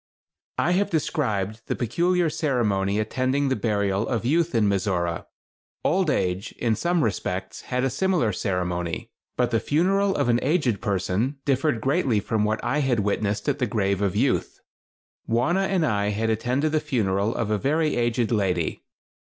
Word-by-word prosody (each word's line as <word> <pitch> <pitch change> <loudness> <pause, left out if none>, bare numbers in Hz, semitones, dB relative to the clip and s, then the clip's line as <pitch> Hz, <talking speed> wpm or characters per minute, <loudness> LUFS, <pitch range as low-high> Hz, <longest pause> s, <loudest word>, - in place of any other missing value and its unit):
I 175 - +2
have 195 +2 +2
described 110 - -1
the - - -1
peculiar 170 +9 +1
ceremony 120 -11 0
attending 130 +6 0
the 130 - +1
burial 100 -1 0
of 115 -2 -2
youth 165 +3 +1
in 110 -2 +3
Mizora. 95 -4 -1 0.6
Old 180 +1 +2
age, 90 -6 -1
in 115 -2 0
some 170 +6 +1
respects, 110 - -3
had 125 0 0
a 135 - +2
similar 160 - +1
ceremony, 90 -3 -2 0.3
but 125 -1 +1
the 115 - +2
funeral 195 - +1
of - - +1
an 120 0 +3
aged 135 - +1
person 105 +5 -1
differed 140 -3 +1
greatly 135 - +1
from 105 +1 -1
what 110 +1 -1
I 125 +5 0
had 130 -6 +1
witnessed 105 0 -1
at - - 0
the 125 - +1
grave 100 -2 0
of 100 -3 0
youth. - - 0 0.7
Wauna 170 +12 +1
and 185 -4 +1
I 100 -7 +1
attended 115 +7 0
the 155 - +2
funeral 110 -8 0
of 110 -2 -1
a 105 - +1
very 155 +6 +1
aged 120 -1 0
lady. 95 -7 0
120 Hz, 160 wpm, -24 LUFS, 100-150 Hz, 0.7 s, in